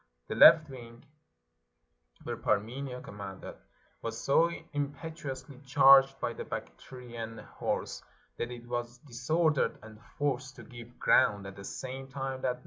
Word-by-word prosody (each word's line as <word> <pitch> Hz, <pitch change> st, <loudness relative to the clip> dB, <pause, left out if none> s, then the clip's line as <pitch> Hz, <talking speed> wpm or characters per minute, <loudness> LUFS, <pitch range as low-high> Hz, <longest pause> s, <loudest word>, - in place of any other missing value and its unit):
The -, -, -2 dB
left 155 Hz, -2 st, +8 dB
wing, 120 Hz, -3 st, -12 dB, 1.2 s
where -, -, -4 dB
Parmenio 125 Hz, +5 st, -2 dB
commanded, 100 Hz, -2 st, -8 dB, 0.5 s
was 115 Hz, 0 st, -4 dB
so 160 Hz, +7 st, +3 dB, 0.2 s
impetu 145 Hz, +1 st, -4 dB
ously 130 Hz, 0 st, -8 dB
charged 135 Hz, 0 st, +6 dB
by 120 Hz, -, -2 dB
the -, -, -6 dB
Bactrian 115 Hz, -, -8 dB
horse -, -, -4 dB, 0.4 s
that 120 Hz, -, -3 dB
it 120 Hz, -1 st, -9 dB
was 120 Hz, 0 st, -4 dB
disor 150 Hz, +5 st, +1 dB
dered 140 Hz, -, 0 dB
and 110 Hz, -1 st, -13 dB, 0.2 s
forced 140 Hz, -2 st, -2 dB
to -, -, -11 dB
give 120 Hz, 0 st, -12 dB
ground, 100 Hz, -1 st, +3 dB
at 95 Hz, 0 st, -8 dB
the 100 Hz, -, -10 dB
same 130 Hz, +5 st, -6 dB
time 135 Hz, -1 st, -5 dB
that 125 Hz, -1 st, -1 dB
125 Hz, 140 wpm, -30 LUFS, 115-135 Hz, 1.2 s, left